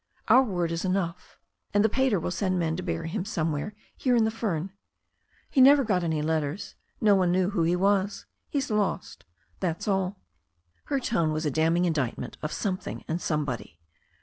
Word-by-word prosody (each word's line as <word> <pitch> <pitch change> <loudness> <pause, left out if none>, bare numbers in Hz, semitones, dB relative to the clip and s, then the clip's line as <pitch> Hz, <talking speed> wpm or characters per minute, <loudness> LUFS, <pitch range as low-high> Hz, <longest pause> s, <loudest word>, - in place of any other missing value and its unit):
Our 255 - +8
word 180 -9 -1
is 165 0 -2
enough. 185 -2 -2 0.4
And 205 +1 +5
the - - +7
pater 255 -3 +2
will 170 - -3
send 185 0 0
men 165 -2 0
to 185 - -4
bury 165 -2 -3
him 190 +2 -2
somewhere 165 -1 -2 0.2
here 250 -2 +1
in 230 - +4
the 220 - +1
fern. 195 -6 -2 0.8
He 270 - +3
never 275 +2 +8
got 190 -6 +1
any 160 -3 0
letters. 155 +2 -2 0.3
No 210 -2 +5
one 185 -3 +3
knew 185 +2 +2
who 195 -5 0
he 165 +2 +2
was. 200 +2 +1 0.2
He's 275 -5 -1
lost 205 - -1 0.3
That's 170 -1 -2
all." 195 -1 0 0.7
Her 275 - 0
tone 170 -11 0
was 155 +1 -2
a 150 - +1
damning 165 +4 +2
indictment 145 -8 -2
of 150 - -3
something 190 -3 -3
and 165 +2 -2
somebody. 130 - -3
180 Hz, 180 wpm, -27 LUFS, 160-205 Hz, 0.8 s, Our